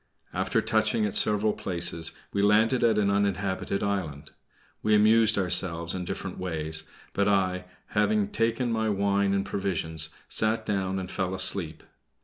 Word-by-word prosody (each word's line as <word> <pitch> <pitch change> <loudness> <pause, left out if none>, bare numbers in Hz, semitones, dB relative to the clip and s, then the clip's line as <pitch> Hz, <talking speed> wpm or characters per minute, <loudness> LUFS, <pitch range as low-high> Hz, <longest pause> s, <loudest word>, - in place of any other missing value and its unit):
After - - 0
touching 110 -2 +1
at 105 - -3
several 105 0 +3
places, 85 -2 -1 0.2
we 100 - +1
landed 110 +5 +3
at 115 -2 +3
an 100 -1 +2
uninhabited 100 -1 -1
island. 80 -8 -3 0.5
We 110 0 +3
amused 110 +1 +4
ourselves 90 -3 +1
in 90 -1 -4
different - - -5
ways, 80 -3 -2 0.3
but 100 0 +1
I, 95 -2 +1 0.2
having 105 -1 +1
taken 115 +2 0
my 110 -1 0
wine 100 0 +1
and 100 0 0
provisions, 80 -5 -2 0.2
sat 110 +1 +2
down 95 -2 -1
and 95 -1 -5
fell 95 0 -2
asleep. 95 -5 -1
100 Hz, 145 wpm, -27 LUFS, 90-105 Hz, 0.5 s, amused